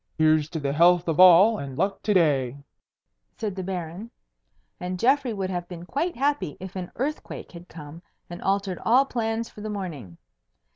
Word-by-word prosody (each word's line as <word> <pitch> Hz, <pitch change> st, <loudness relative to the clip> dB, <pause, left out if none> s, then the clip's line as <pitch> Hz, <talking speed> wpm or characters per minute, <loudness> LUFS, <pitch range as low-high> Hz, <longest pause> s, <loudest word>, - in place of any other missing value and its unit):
"Here's 155 Hz, -1 st, +3 dB
to 160 Hz, -, -4 dB
the 140 Hz, -1 st, -2 dB
health 175 Hz, +3 st, +4 dB
of 165 Hz, 0 st, -1 dB
all, 185 Hz, +5 st, +7 dB
and 135 Hz, -2 st, -7 dB
luck 195 Hz, +3 st, -1 dB
to 210 Hz, -, +1 dB
day," 140 Hz, -7 st, +2 dB, 0.8 s
said 210 Hz, -4 st, -3 dB
the 190 Hz, -, -4 dB
Baron; 180 Hz, +3 st, -5 dB, 0.7 s
and 180 Hz, +1 st, -4 dB
Geoffrey 260 Hz, +4 st, +2 dB
would 195 Hz, -3 st, -3 dB
have 175 Hz, -1 st, -4 dB
been 175 Hz, -1 st, -9 dB
quite 335 Hz, -, -2 dB
happy 270 Hz, -, -1 dB
if 190 Hz, 0 st, -9 dB
an 180 Hz, -2 st, -5 dB
earthquake 290 Hz, +6 st, -5 dB
had 175 Hz, 0 st, -12 dB
come 155 Hz, +1 st, -11 dB, 0.3 s
and 175 Hz, -, -9 dB
altered 195 Hz, -2 st, -1 dB
all 255 Hz, +4 st, +4 dB
plans 225 Hz, -2 st, -2 dB
for 210 Hz, -, -13 dB
the 215 Hz, -, -5 dB
morning. 155 Hz, -, -6 dB
185 Hz, 180 wpm, -25 LUFS, 165-215 Hz, 0.8 s, all